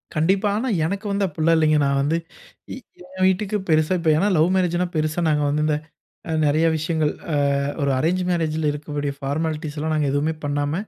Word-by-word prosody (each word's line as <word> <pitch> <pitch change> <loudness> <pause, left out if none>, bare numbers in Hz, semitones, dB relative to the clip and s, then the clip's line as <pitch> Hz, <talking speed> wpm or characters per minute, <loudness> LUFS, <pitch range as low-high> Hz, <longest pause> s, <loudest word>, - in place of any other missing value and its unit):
கண்டிப்பா. 190 +6 +2
ஆனா, 255 +4 -1 0.2
எனக்கு 200 +5 -3
வந்து 200 0 +1
அப்டில்லாம் 165 0 +1
இல்லைங்க. 155 -1 +3
நான் 140 0 +1
வந்து 155 +4 +1 1.0
என் 185 0 +1
வீட்டுக்கு 195 +2 0
பெருசா 155 +2 +3
இப்போ 165 -2 +2
ஏன்னா, 195 +6 +2
லவ் 160 +3 +4
மேரேஜ்ன்னா 180 -1 +1
பெருசா 155 +2 0
நாங்க 150 -1 +1
வந்து 150 +1 0
இந்த 150 -1 +1 0.7
நெறைய 155 +3 +2
விஷயங்கள், 155 -1 0 0.2
அ - - +1 0.5
ஒரு 140 - +1
அரேஞ்சு 180 +6 0
மேரேஜ்ல 160 -2 0
இருக்கக்கூடிய 145 -1 -4
பார்மாலிட்டீஸ்லாம் 155 +1 -2
நாங்க 150 -2 +1
எதுவுமே 150 +3 0
பண்ணாம, 145 0 -1
155 Hz, 165 wpm, -22 LUFS, 150-175 Hz, 1.0 s, லவ்